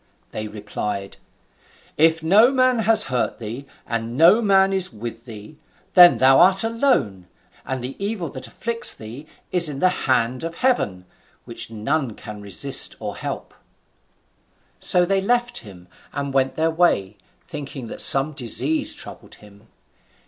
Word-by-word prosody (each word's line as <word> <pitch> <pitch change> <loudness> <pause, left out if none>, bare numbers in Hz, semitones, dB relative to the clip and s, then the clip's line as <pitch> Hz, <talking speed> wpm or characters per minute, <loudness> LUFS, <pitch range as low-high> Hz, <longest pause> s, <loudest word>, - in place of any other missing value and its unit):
They 110 0 -5
replied, 105 -1 -6 0.8
"If 160 +1 +2
no 210 +10 +5
man 255 -2 +2
has 225 0 +3
hurt 125 -2 -2
thee, 120 +5 -8 0.2
and 115 +1 -4
no 175 +9 +5
man 195 -2 +3
is 190 -1 -1
with 115 +1 -9
thee, 110 +5 -12 0.4
then 175 -1 +7
thou 135 +1 +5
art 190 +3 +5
alone, 225 - -1 0.4
and 130 -2 -4
the 130 +2 -6
evil 200 -4 -3
that 130 -2 -9
afflicts 230 - -2
thee 120 +8 -11 0.2
is 175 -3 +6
from 140 - -6
the 185 +6 +2 0.2
hand 125 +1 0
of 165 0 -6
Heaven, 135 - -1 0.4
which - - -7
none 115 +2 -3
can 105 -1 -10
resist 130 +7 +1
or - - -6
help." - - -7 1.3
So 180 -1 +3
they 195 +1 0
left 240 +3 -1
him 90 -4 -14 0.2
and 140 -1 -5
went 135 -1 0
their 160 +1 0
way, 135 - 0 0.3
thinking 145 -5 -8
that - - -5
some 135 +3 +5
disease 135 +3 +1
troubled - - -10
him. 105 +1 -19
140 Hz, 150 wpm, -21 LUFS, 115-185 Hz, 1.3 s, then